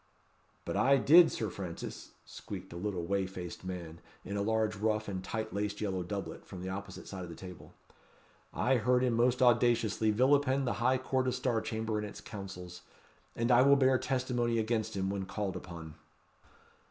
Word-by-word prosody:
"But - - -3
I 140 +1 +5
did, 165 +6 +7
Sir 110 -4 -3
Francis," 90 -4 -7
squeaked - - -8
a - - -9
little 90 -1 -3
whey 95 +1 0
faced 90 -2 -7
man, 85 -3 -6 0.2
in 100 - -4
a 100 - 0
large 110 0 +1
ruff 110 +1 0
and 95 -2 -4
tight 110 +2 -4
laced 105 +1 -2
yellow 95 -3 -1
doublet, 100 +3 -5
from 90 -2 -9
the 95 - -4
opposite 95 0 -7
side 95 -2 -6
of 90 - -8
the 85 - -8
table; 90 -2 -11 0.8
"I 130 +1 +2
heard 125 +2 +2
him 125 -2 +2
most 120 +2 +3
audaciously 120 -2 +3
vilipend 135 +4 +3
the 125 - 0
high 130 +2 +3
court 130 0 -1
of 125 - 0
Star 125 -3 0
Chamber 110 -1 -2
and 105 - -3
its - - -9
councils; 90 -3 -8 0.5
and 115 +2 +1
I 120 0 +7
will 140 +1 +6
bear 130 -2 +4
testimony 125 -3 0
against 110 -2 -1
him 95 0 0
when 95 -1 -3
called 100 -2 -3
upon." 85 -3 -8
110 Hz, 185 wpm, -32 LUFS, 95-125 Hz, 0.8 s, did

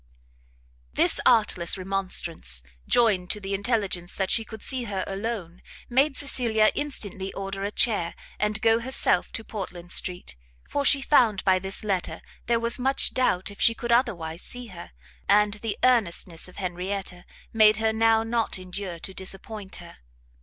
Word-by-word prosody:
This - - +2
artless 200 -6 +3
remonstrance, 180 - -1 0.2
joined 205 -7 +3
to 210 - +1
the 195 0 -5
intelligence 200 -4 -1
that 190 -1 -1
she 225 - +2
could 220 -1 -10
see 255 -3 0
her 195 -3 -3
alone, 195 -4 -5 0.3
made 270 +3 +2
Cecilia 230 -6 +2
instantly 205 -9 -3
order 195 0 -5
a 200 - -1
chair, 205 -6 +2 0.2
and 210 0 -1
go 225 0 +4
herself 235 -7 +1
to 225 - -4
Portland 180 -5 -7
street: 180 - +1 0.3
for 285 - -1
she 275 -1 +4
found 230 -9 +3
by 190 -1 +4
this 190 +2 -4
letter 195 -4 -2 0.2
there 235 0 +2
was 235 +2 +1
much 265 +2 0
doubt 200 -8 +1
if 200 - -11
she 230 - +5
could 235 0 -4
otherwise 185 -9 0
see 245 -1 -5
her, 170 - -10 0.4
and 210 0 +4
the 225 -3 -3
earnestness 185 -9 +2
of 180 - -15
Henrietta 185 0 -4 0.3
made 215 -2 +6
her 220 0 +1
now 225 0 +3
not 225 -2 -1
endure 185 -1 -6
to 190 +3 -6
disappoint 195 +2 -5
her. 170 -1 -11
205 Hz, 160 wpm, -25 LUFS, 185-230 Hz, 0.4 s, made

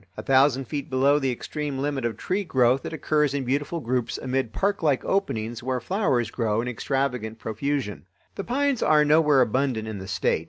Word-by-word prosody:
A 110 - -5
thousand 135 +1 +3
feet 145 +2 -5
below 140 +3 +3
the 135 -2 0
extreme 145 +3 -4
limit 140 -2 -2
of 115 -3 -2
tree 190 +9 -1
growth 130 -5 +2
it - - -6
occurs 150 -3 0
in 140 - -1
beautiful 145 +6 -1
groups 125 -3 -2
amid 130 -3 -2
parklike 165 - 0
openings 120 - -1
where 130 +1 -1
flowers 135 - 0
grow 110 -3 0
in 120 - -2
extravagant 125 -2 -2
profusion. 110 -3 -3 0.3
The 200 - -5
pines 275 +2 0
are 150 0 +4
nowhere 150 -2 +5
abundant 125 -2 0
in 110 -2 -5
the 95 - -8
State. - - 0
135 Hz, 185 wpm, -25 LUFS, 120-150 Hz, 0.3 s, nowhere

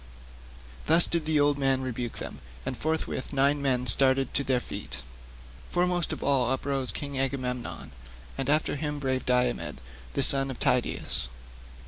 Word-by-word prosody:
Thus 165 +2 +7
did 170 -2 -1
the 155 -1 +2
old 145 0 +3
man 135 -1 +1
rebuke 120 -2 -4
them, - - -6 0.3
and - - -3
forthwith 155 -2 -2
nine 140 +1 +2
men 130 -2 +1
started 130 +3 +3
to 140 - +1
their 130 -2 +1
feet. 60 - -7 0.7
Foremost 180 -1 +1
of - - -5
all 135 -4 +2
uprose 130 0 0
King 140 -2 -5
Agamemnon, 130 -2 -3 0.4
and 135 0 -3
after 150 0 +2
him 150 0 -3
brave 130 -2 -2
Diomed 125 -11 0 0.4
the - - +2
son 135 0 +6
of 130 - -5
Tydeus. 125 - +1
135 Hz, 150 wpm, -28 LUFS, 125-145 Hz, 0.7 s, Thus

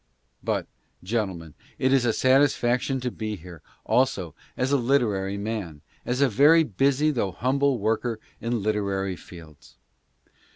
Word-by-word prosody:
But, - - -1 0.4
gentlemen, 95 -7 -3 0.2
it 130 +1 +2
is 130 -3 +3
a 115 - +3
satisfaction 130 0 +2
to 125 0 -2
be 110 -2 -4
here, 85 -3 -12 0.2
also, 100 - +1 0.2
as 130 +2 0
a 140 - +4
literary 110 -7 +1
man, 100 -8 -4 0.3
as 125 +2 0
a 140 - +5
very 150 +8 +5
busy 140 +5 +1
though 115 -9 -1
humble 135 +4 +1
worker 110 +2 -1 0.2
in 115 -2 -2
literary 100 -3 -1
fields. 80 -4 -14
115 Hz, 135 wpm, -25 LUFS, 95-130 Hz, 0.4 s, a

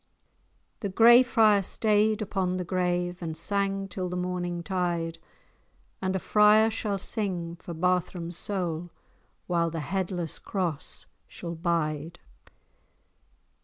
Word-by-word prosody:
A 200 - -2
Gray 235 +5 +7
Friar 220 -5 +4
staid 215 +2 +1
upon 190 -3 -1
the 180 - -2
grave, 180 0 -1
And 160 -2 -4
sang 195 +2 +1
till 185 -2 -4
the 180 - -3
morning 180 -1 -3
tide, 170 -3 -2 0.8
And 190 0 -1
a - - 0
friar 215 +3 +5
shall 215 -2 -2
sing 180 -4 -3
for 170 -1 -8
Barthram's 180 0 -1
soul, 175 -3 -3 0.6
While 170 -1 +1
the 165 0 -4
Headless 180 -1 -3
Cross 175 -7 -3 0.2
shall 170 -1 -7
bide. 165 -2 -2
180 Hz, 120 wpm, -27 LUFS, 170-200 Hz, 0.8 s, Gray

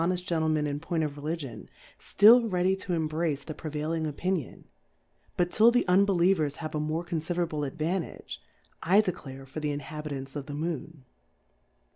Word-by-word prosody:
59 180 +2 +1
honeft 180 - -6
Gentlemen 160 -2 +1
in 145 0 -2
Point 165 +1 -1
of 145 -2 -3
Religion) 145 -4 -5 0.3
ftill 225 +2 +6
ready 185 +1 +2
to 190 -1 -4
embrace 155 -2 -1
the 155 - -6
prevailing 155 +1 -3
Opi 180 +6 -2
nion, 160 -10 -5 0.7
but 175 0 +1
till 220 +2 +6
the 245 +1 +2
Unbelievers 180 -5 +3
have 155 -1 -6
a 155 - -1
more 155 +3 -2
confiderable 165 -3 -2
Advantage, 165 +5 -4 0.4
I 190 +5 +5
declare 135 -9 -6
for 135 +4 -7
the 150 -1 -2
Inhabitants 145 -1 -5
of 145 -2 -5
the 145 - -5
Moon. 160 -2 -4
160 Hz, 160 wpm, -28 LUFS, 150-180 Hz, 0.7 s, ftill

